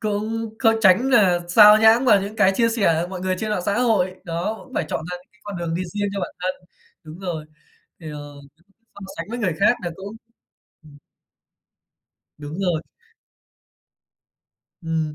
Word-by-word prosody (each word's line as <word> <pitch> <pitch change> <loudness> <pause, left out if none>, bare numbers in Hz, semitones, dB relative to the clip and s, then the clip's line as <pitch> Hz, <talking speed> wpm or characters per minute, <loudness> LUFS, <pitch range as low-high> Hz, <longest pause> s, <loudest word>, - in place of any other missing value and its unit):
cũng 220 +1 -3
có 225 -3 +4
tránh 210 +6 +4
nà 195 -8 +4
sao 210 +3 +8
nhãng 220 +3 +5
vào 210 -6 +5
những 205 +2 -7
cái 190 - +4
chia 230 -1 +3
sẻ 200 -8 +1
của 175 - -5
mọi 185 -1 -7
người 185 0 -1
trên 215 +1 -3
mạng 200 -4 -1
xã 200 +4 0
hội. 210 -7 +1
Đó, 175 +6 -3
cũng 260 - -16
phải - - 0
chọn - - -2
ra 180 - -4
những 180 - -20
cái 210 - -30
con 205 -3 -7
đường 170 -1 -3
đi 175 - -2
riêng 205 0 -1
cho 200 - -3
bản - - -5
thân. 185 +1 -1 0.5
Đúng 155 +2 -11
rồi, 175 -5 -5 0.6
thì, 160 -2 -8
ờ, 145 -1 -9 0.6
không 200 - -10
sánh 165 - -5
với 240 - -4
người 200 -7 0
khác 205 - +5
là 175 - -3
cũng 200 +3 -9 0.7
ừm. 150 -2 -16 1.4
Đúng 150 +3 -8
rồi. 175 -5 0 2.0
Ừm, 160 -2 -2
190 Hz, 185 wpm, -22 LUFS, 170-215 Hz, 2.0 s, sao